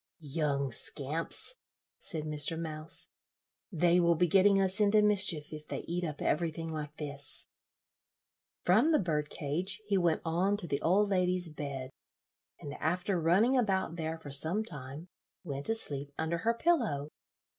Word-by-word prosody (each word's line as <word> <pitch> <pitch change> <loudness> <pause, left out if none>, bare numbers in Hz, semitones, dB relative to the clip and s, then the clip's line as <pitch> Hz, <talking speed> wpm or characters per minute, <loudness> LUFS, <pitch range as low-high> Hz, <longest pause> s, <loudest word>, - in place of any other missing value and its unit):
"Young 140 -4 0
scamps," 150 - +2 0.5
said 160 -2 -3
Mr. 150 +1 -1
Mouse, 155 -1 -5 0.6
"they 175 0 +3
will 170 -1 +3
be 175 - +3
getting 195 +3 +5
us 190 +1 +2
into 210 0 +4
mischief 190 -8 +3
if 155 0 -9
they - - -4
eat 175 +1 -4
up 150 -3 -4
everything 165 +1 -1
like 150 -1 -6
this." 140 -2 -4 1.2
From 225 - +4
the - - +6
bird 150 -5 -1
cage 170 +8 -3
he 200 -2 +1
went 170 -3 +1
on 180 +5 +1
to 200 - -5
the 140 -4 -2
old 200 +5 +3
lady's 180 -2 +1
bed, 135 -3 -5 0.7
and 145 - -7
after 180 +3 -1
running 195 +11 +3
about 190 -8 0
there 160 -1 -3
for 150 -3 -10
some 160 +10 +1
time, 145 - -6 0.4
went 140 -4 -5
to 225 - +2
sleep 140 -9 0
under 160 +1 -1
her 230 +4 +1
pillow. 230 - 0
165 Hz, 155 wpm, -31 LUFS, 150-190 Hz, 1.2 s, the